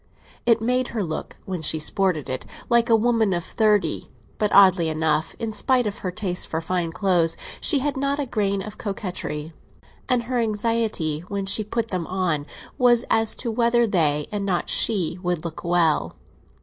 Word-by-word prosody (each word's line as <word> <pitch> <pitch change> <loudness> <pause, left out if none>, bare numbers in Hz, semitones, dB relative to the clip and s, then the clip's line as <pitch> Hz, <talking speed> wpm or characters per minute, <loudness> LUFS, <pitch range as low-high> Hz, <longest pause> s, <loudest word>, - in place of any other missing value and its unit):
It 230 -1 +4
made 250 +2 +1
her 210 - +1
look, 160 -3 -5
when 185 -3 -4
she 160 0 +2
sported 160 0 0
it, 130 0 -3 0.3
like 235 0 +3
a 230 - +6
woman 225 -3 +2
of 175 -1 -1
thirty; 210 +1 +1 0.3
but 210 -1 +1
oddly 185 -4 +6
enough, 155 0 0
in 225 -1 -3
spite 245 +4 +2
of 210 -1 -4
her 185 - -3
taste 180 -1 -2
for 160 - -2
fine 170 0 -2
clothes, 175 -3 +1 0.2
she 300 - +3
had 290 - 0
not 275 +1 0
a 290 - -1
grain 200 -5 -1
of 215 +1 -9
coquetry, 175 -6 -5 0.6
and 250 -2 +2
her 245 +1 -2
anxiety 215 -8 0
when 200 -1 -3
she 205 +3 +2
put 225 +2 -3
them 180 -5 -3
on 175 -6 -1 0.3
was 245 -1 +4
as 225 -1 +4
to 235 - -3
whether 235 +1 +3
they, 155 -8 +1
and 205 -1 -2
not 185 -3 -1
she, 185 -5 +1
would 175 -3 -2
look 165 -1 -6
well. 170 -2 +1
200 Hz, 180 wpm, -23 LUFS, 170-230 Hz, 0.6 s, a